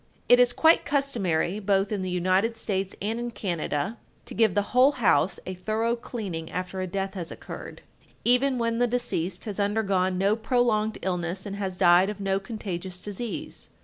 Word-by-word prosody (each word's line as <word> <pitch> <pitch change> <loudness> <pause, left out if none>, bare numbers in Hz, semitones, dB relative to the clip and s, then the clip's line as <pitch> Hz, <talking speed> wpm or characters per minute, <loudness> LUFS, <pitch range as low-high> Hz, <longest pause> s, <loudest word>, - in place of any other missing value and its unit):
It 245 - +7
is 245 0 +5
quite 320 +5 +4
customary, 210 - 0
both 195 0 +1
in 205 -2 -1
the 185 - -3
United 185 +5 +1
States 195 -3 -2
and 220 +3 -1
in 240 0 -3
Canada, 175 -2 -3 0.3
to - - -8
give 220 -4 +3
the 205 - +3
whole 260 +3 +6
house 190 - +2
a 185 - -4
thorough 220 +5 -1
cleaning 195 -9 -5
after 185 +1 -4
a 185 - -2
death 195 +1 -3
has 175 -4 -5
occurred, - - -9 0.4
even 255 +2 +3
when 230 -1 0
the 245 - +3
deceased 195 -7 -2
has 210 -2 -5
undergone 200 -3 +1
no 200 +3 +3
prolonged 220 -2 +1
illness 180 0 -2
and 200 -1 -5
has 190 -2 -3
died 180 +1 +5
of 210 -1 -6
no 195 -1 0
contagious 190 -4 -5
disease. 210 +4 -5
200 Hz, 180 wpm, -26 LUFS, 185-230 Hz, 0.4 s, It